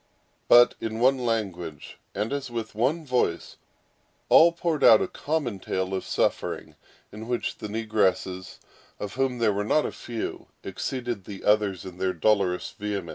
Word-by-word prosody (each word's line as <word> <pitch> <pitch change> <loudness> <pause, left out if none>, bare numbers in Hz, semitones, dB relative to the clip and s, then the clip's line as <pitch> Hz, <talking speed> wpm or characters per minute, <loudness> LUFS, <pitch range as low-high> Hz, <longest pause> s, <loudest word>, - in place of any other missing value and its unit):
But, 120 0 +7
in 110 0 -3
one 130 +2 +4
language, 95 - -3 0.2
and 105 +6 -2
as 140 -2 -3
with 115 -2 -5
one 135 +9 0
voice, 125 - -1 0.7
all 170 +1 +7
poured 170 -2 -2
out 110 - +8
a - - -1
common 145 -10 -3
tale 95 0 -3
of 95 - -2
suffering; - - -1 0.4
in 110 +2 -9
which 120 0 -2
the 105 - -5
negresses, 100 -4 -1 0.4
of 105 -1 -5
whom 130 -1 0
there 115 -3 +2
were 100 +1 -1
not 150 +8 +2
a - - -3
few, 115 -2 -6 0.2
exceeded 120 +1 -4
the 100 -2 -9
others 105 -4 +2
in 90 -1 -9
their 95 -1 0
dolorous 95 0 +1
vehemence. 100 -4 -4
110 Hz, 160 wpm, -26 LUFS, 95-125 Hz, 0.7 s, out